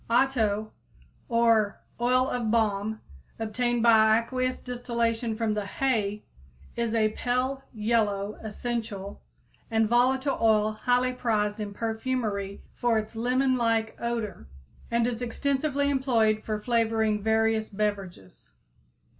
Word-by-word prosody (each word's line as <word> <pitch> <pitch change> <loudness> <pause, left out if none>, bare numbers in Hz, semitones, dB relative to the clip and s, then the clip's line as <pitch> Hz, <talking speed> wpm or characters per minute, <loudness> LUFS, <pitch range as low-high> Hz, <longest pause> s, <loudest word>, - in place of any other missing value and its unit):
Otto 225 -4 +1 0.6
or 230 -3 +3 0.2
oil 255 +2 +3
of 240 -4 -2
balm, 220 -1 0 0.4
obtained 240 +2 -1
by 220 -2 +6
aqueous 255 +2 -2
distillation 235 -2 -2
from 220 -1 0
the 210 -1 -3
"hay," 210 -4 -1 0.5
is 230 -1 -1
a 215 -1 +3
pale 255 +4 -1
yellow, 210 -3 0
essential 215 -3 -5 0.5
and 225 -1 +2
volatile 260 +4 +2
oil 215 -1 +4
highly 250 +3 +1
prized 215 -4 0
in 210 -1 -4
perfumery 220 -2 -3
for 240 -2 +1
its 215 +1 -4
lemon 255 +3 +1
like 225 -2 0
odor, 230 - -3 0.4
and 235 0 +2
is 240 -1 -2
extensively 280 +3 0
employed 230 -6 +2
for 215 -1 -2
flavoring 220 -2 +1
various 220 0 +1
beverages. 195 - -4
225 Hz, 115 wpm, -27 LUFS, 215-245 Hz, 0.6 s, by